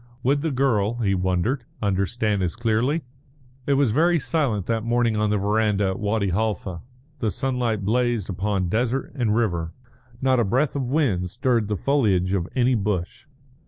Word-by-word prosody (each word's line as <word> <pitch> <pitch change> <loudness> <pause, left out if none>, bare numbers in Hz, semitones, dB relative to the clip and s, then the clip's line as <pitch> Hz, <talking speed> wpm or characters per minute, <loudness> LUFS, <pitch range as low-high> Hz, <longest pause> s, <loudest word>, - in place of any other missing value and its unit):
Would 140 +3 +2
the 160 - 0
girl, 120 -6 +1
he 110 -5 0
wondered, 95 +8 0 0.2
understand 100 +1 0
as 90 0 -1
clearly? 120 +7 0 0.6
It 140 - +3
was 135 -4 +3
very 170 +8 +3
silent 135 - -1
that 115 -1 -1
morning 120 -1 +1
on 105 0 +1
the 105 - +2
verandah 105 0 +1
at 95 - -4
Wadi 105 -2 0
Halfa; 95 -3 -2 0.4
the 110 - 0
sunlight 120 -4 -1
blazed 120 -2 +1
upon 95 0 -1
desert 120 +7 -1
and 120 -6 0
river; 85 -8 -1 0.5
not 130 -1 +2
a - - +3
breath 130 +8 +1
of 135 -3 -1
wind 120 - +1
stirred 120 0 0
the 105 -1 -1
foliage 100 - +1
of 90 -3 0
any 130 0 +3
bush. 105 +2 -2
110 Hz, 165 wpm, -23 LUFS, 100-125 Hz, 0.6 s, It